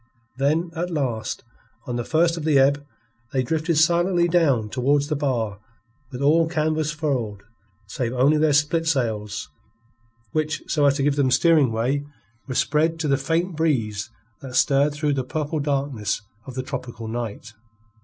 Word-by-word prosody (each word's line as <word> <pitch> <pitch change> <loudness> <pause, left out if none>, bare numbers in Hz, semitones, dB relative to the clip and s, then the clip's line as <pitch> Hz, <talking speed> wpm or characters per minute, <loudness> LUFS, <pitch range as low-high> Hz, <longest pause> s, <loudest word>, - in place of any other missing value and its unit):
Then, 155 +6 +1
at 175 +2 -2
last, 130 -9 -2 0.4
on 125 -3 -4
the 120 - -2
first 165 +5 +2
of 165 - -5
the 155 -2 +3
ebb, 140 +2 +3 0.5
they 130 -1 +1
drifted 160 +4 0
silently 175 +2 +3
down 150 -11 +2
towards 140 +5 +1
the 155 - 0
bar 120 -8 -1 0.5
with 130 +1 -5
all 160 +3 +4
canvas 155 -2 0
furled 130 -10 -2 0.4
save 115 +4 -3
only 135 +5 +3
their 155 +1 +3
spiltsails, 135 -9 0 0.8
which, 155 0 -1
so 145 -2 +2
as 140 - +3
to 140 - -1
give 145 0 +1
them 135 -2 +3
steering 155 -2 +4
way, 125 +6 0 0.4
were 130 - -4
spread 160 +5 +1
to 155 - -1
the 140 - +3
faint 165 +6 -1
breeze 115 -10 0 0.3
that 130 -2 -8
stirred 140 +1 +3
through 150 0 0
the 135 -2 -1
purple 150 +4 -3
darkness 140 -8 -1 0.2
of 130 - -8
the 130 - -2
tropical 125 -4 -6
night. 110 -1 -5
145 Hz, 160 wpm, -23 LUFS, 125-155 Hz, 0.8 s, all